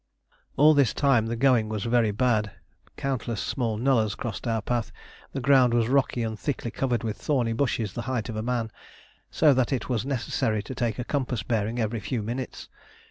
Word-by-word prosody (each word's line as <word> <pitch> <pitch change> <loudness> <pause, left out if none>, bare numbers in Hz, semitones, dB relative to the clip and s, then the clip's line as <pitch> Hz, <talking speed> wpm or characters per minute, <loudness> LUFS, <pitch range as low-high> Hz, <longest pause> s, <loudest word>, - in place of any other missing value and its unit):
All 155 +2 +7
this 140 -5 +3
time 130 -6 +3
the 115 - -2
going 120 -3 +3
was 110 -2 -3
very 115 -1 +2
bad. 105 -1 +1 0.5
Countless 125 -5 -2
small 115 -5 -2
nullahs 115 -4 +2
crossed 115 0 -5
our 115 -1 +1
path. 120 -1 -1 0.4
The 135 - -2
ground 130 -2 +4
was 115 -2 +2
rocky 130 -3 +1
and 110 -1 -4
thickly 130 -5 -3
covered 125 -3 -1
with 110 -3 -3
thorny 120 -2 0
bushes 115 -5 -1
the 120 - -4
height 125 -4 -1
of 115 - -5
a 110 - -2
man, 115 -1 -2 0.6
so 150 -2 +4
that 130 0 +1
it 135 -1 -2
was 120 -4 0
necessary 115 -5 -1
to 130 - -7
take 120 -2 -1
a 125 - -2
compass 125 -6 -2
bearing 110 +1 -1
every 115 -1 -1
few 115 +1 -3
minutes. 120 +4 -5
120 Hz, 190 wpm, -26 LUFS, 110-130 Hz, 0.6 s, All